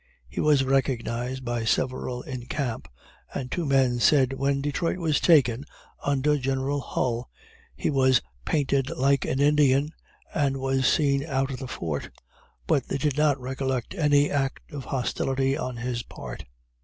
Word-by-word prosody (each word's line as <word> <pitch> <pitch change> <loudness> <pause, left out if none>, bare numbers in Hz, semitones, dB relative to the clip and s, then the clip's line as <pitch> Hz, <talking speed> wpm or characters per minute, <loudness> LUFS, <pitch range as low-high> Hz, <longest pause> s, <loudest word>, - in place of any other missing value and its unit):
He - - -4
was 150 -3 +4
recognized 130 -1 -1
by 120 -1 -1
several 125 +1 -1
in 130 -5 -7
camp, 130 -7 -3 0.5
and 130 -2 -4
two 175 -4 -1
men 130 -3 +3
said, 135 0 +4
"when 140 +1 0
Detroit 145 +5 -1
was 160 -4 +1
taken, 135 -7 +4 0.4
under 145 +1 +2
General 135 +2 -1
Hull, 125 -2 -2 0.5
he - - -1
was 130 -3 +4 0.2
painted 140 - +1
like 140 +1 +2
an 130 - -1
Indian, 145 0 +4 0.4
and 140 -3 +1
was 135 0 +1
seen 140 -3 +2
out 135 -2 -1
of 130 - -5
the 130 - -5
fort," 80 - -4 0.6
but 145 -6 +1
they - - -1
did 140 0 0
not 150 -2 +2
recollect 130 -1 -3
any 145 -2 +3
act 135 -2 -2
of 140 -3 -6
hostility 135 +1 0
on 130 -5 -4
his 120 0 -2
part. 65 - -9
135 Hz, 155 wpm, -26 LUFS, 125-145 Hz, 0.6 s, was